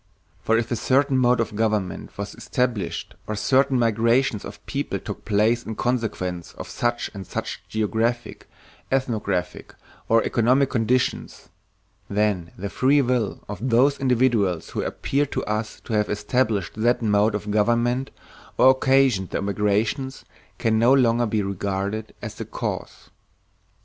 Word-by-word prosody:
For 115 - +2
if 115 0 -2
a - - +2
certain 135 +4 +2
mode 125 -1 +3
of 110 -2 -2
government 105 -4 -1
was - - -5
established 110 -9 -2
or 110 - -2
certain 130 +4 +2
migrations 115 0 +2
of 105 +1 -10
peoples 140 +1 -3
took - - -6
place 110 +3 +2
in 110 - -6
consequence 105 -9 -2
of - - -8
such 120 0 -2
and 95 -2 -8
such - - -4
geographic, 110 +2 -2 0.4
ethnographic, 105 -9 -2 0.3
or 115 0 +4
economic 130 +4 +2
conditions, 120 +1 -1 0.6
then 100 -5 0
the 100 +2 -4
free 140 +2 +3
will 120 -5 -1
of 105 +5 -4
those 135 +5 +3
individuals 120 -9 +1
who - - -2
appear 145 +1 -1
to - - -3
us 105 +1 -3
to - - -6
have 105 -1 +1
established 105 -2 0
that 120 +1 +2
mode 105 0 +3
of 105 0 -4
government 120 +4 +1 0.5
or 130 - +7
occasioned 130 -7 +2
the - - -2
migrations 105 +6 -1 0.3
can 110 +1 +1
no 120 +3 +5
longer 120 -2 +3
be 105 -1 0
regarded 100 +2 -3
as - - -5
the - - -7
cause. - - -5
115 Hz, 145 wpm, -23 LUFS, 105-125 Hz, 0.6 s, or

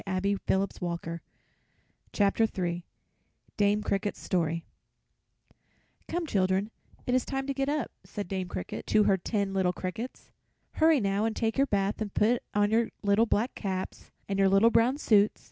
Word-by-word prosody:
DAME 195 +1 0
CRICKET'S 195 +1 +1
STORY 170 -2 -4 1.0
[Illustration: 195 -4 +1 0.7
Dame 205 0 +2
Cricket] 205 0 -1 1.9
"Come, 345 0 -2
children, 195 -3 +1 0.3
it 250 - 0
is 255 -1 +3
time 270 0 -3
to 275 - -2
get 275 +1 -1
up," 295 -5 -1
said 205 -2 -6
Dame 190 -1 -3
Cricket 90 - -6
to 215 - +4
her 195 -1 +3
ten 200 +1 -2
little 185 -2 +1
crickets. 190 +8 -6 0.4
"Hurry, 315 -2 +4
now, 200 0 0
and 225 -1 -1
take 225 -1 0
your 275 +1 +3
bath 200 0 0
and 210 -2 -2
put 235 +3 +3
on 205 0 +3
your 230 +1 +2
little 205 +3 +3
black 225 +4 +1
caps 190 -2 -5 0.2
and 195 -1 -2
your 195 0 +5
little 200 +4 +5
brown 235 +4 +3
suits. 210 -7 +3
205 Hz, 155 wpm, -29 LUFS, 195-230 Hz, 1.9 s, your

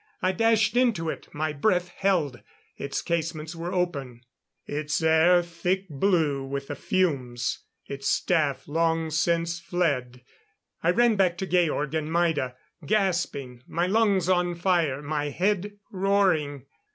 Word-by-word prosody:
I 185 - +1
dashed 220 +1 +2
into 230 -10 +2
it, - - -9
my 155 0 -2
breath 180 +3 +1
held. 175 -9 0 0.3
Its 140 - -4
casements 165 -1 -2
were 170 +2 -4
open; 140 -10 -2 0.4
its 150 0 -2
air 160 +2 +5
thick 180 +3 -2
blue 150 -3 +1
with 140 +1 -5
the 145 - -3
fumes; 130 -10 -1 0.3
its 140 0 -3
staff 145 -6 +1
long 165 +1 0
since 170 +2 0
fled. 140 -9 -1 0.6
I - - +2
ran 240 -3 +4
back 180 -3 +2
to 190 - -3
Georg 165 -5 +1
and 155 0 -2
Maida, 160 -7 +1 0.3
gasping, 160 - -1
my 170 +1 0
lungs 200 -2 +2
on 180 -1 +2
fire, 170 -6 +1
my 145 0 -2
head 205 +5 -1
roaring. 185 -8 +1
165 Hz, 135 wpm, -26 LUFS, 145-185 Hz, 0.6 s, air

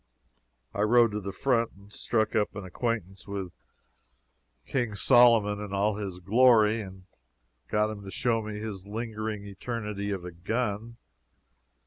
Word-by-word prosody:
I 100 - -2
rode 115 +1 +5
to 105 - -2
the 100 -1 -5
front 115 +1 +1
and 100 +1 -17
struck 110 -2 0
up 105 -2 +1
an 100 - -5
acquaintance 95 -1 -3
with 100 -3 -4 1.1
King 120 -6 -1
Solomon 110 -3 +5
in 100 -1 -7
all 100 +1 +1
his 100 -4 -5
glory, 110 +2 +4
and 95 -2 -10 0.6
got 105 0 +1
him 100 -2 -8
to 100 - -8
show 115 +2 0
me 105 -1 -6
his 105 -3 -6
lingering 110 -1 -4
eternity 105 0 -4
of 95 -3 -3
a 90 - -6
gun. 110 +5 -3
105 Hz, 145 wpm, -28 LUFS, 100-115 Hz, 1.1 s, rode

